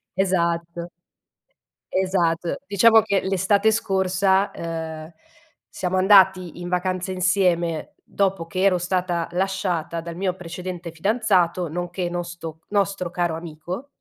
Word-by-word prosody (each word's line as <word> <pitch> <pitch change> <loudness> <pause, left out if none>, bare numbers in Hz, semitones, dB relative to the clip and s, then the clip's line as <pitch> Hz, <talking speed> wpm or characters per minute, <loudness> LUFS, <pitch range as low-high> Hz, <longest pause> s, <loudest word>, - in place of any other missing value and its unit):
Esatto. 170 -2 0 1.0
Esat 175 -3 0
diciamo 220 +3 +6
che, 200 -2 0
l'estate 195 +3 +2
scorsa, 195 -2 +1
uhm, 160 -1 -5 0.6
siamo 185 0 -2
andati 185 -3 +5
in 175 - -5
vacanza 185 +1 -1
insieme, 180 -3 +1
dopo 195 -4 -1
che 185 +2 -3
ero 195 -2 +4
stata 180 -1 -1
lasciata 180 -3 -1
dal 170 0 -7
mio 185 0 -1
precedente 180 -1 -7
fidanzato, 185 -2 +1
nonché 175 +2 -3
nosto 175 -2 -6
nostro 195 -3 0
caro 175 -2 -1
amico 170 - -7
180 Hz, 110 wpm, -23 LUFS, 170-190 Hz, 1.0 s, diciamo